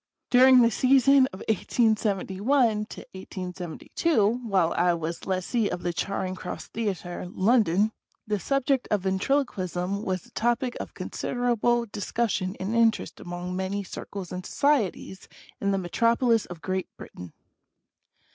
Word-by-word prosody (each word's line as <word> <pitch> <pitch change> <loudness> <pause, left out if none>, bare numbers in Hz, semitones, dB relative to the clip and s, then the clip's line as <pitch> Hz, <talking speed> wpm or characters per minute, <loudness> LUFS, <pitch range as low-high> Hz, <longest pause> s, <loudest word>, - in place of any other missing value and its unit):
During 255 0 +7
the 230 - +4
season 265 +2 +5
of 185 - -9
18*71 210 - -1
2, 260 -12 +3 0.2
while 185 -5 +2
I 175 0 +2
was 165 +2 -5
lessee 195 +4 0
of 175 - -5
the 175 0 -1
Charing 190 +1 -2
Cross 185 -1 -7
Theatre, 185 -5 -4
London, 210 -1 +3 0.3
the 210 -1 -1
subject 275 +2 0
of 210 -2 +1
Ventriloquism 190 -3 -1
was 185 -4 -2
the - - -20
topic 240 +2 0
of - - -7
considerable 240 -1 0
discussion 205 -2 -2
and 200 +5 -2
interest 230 -1 +2
among 175 +1 -5
many 190 +2 -2
circles 190 0 -7
and 180 0 -5
societies 230 - 0 0.3
in 200 - 0
the 195 - +1
Metropolis 230 +5 +2
of 170 -2 -10
Great 185 0 -2
Britain. 90 -3 -10
200 Hz, 130 wpm, -26 LUFS, 185-235 Hz, 0.3 s, During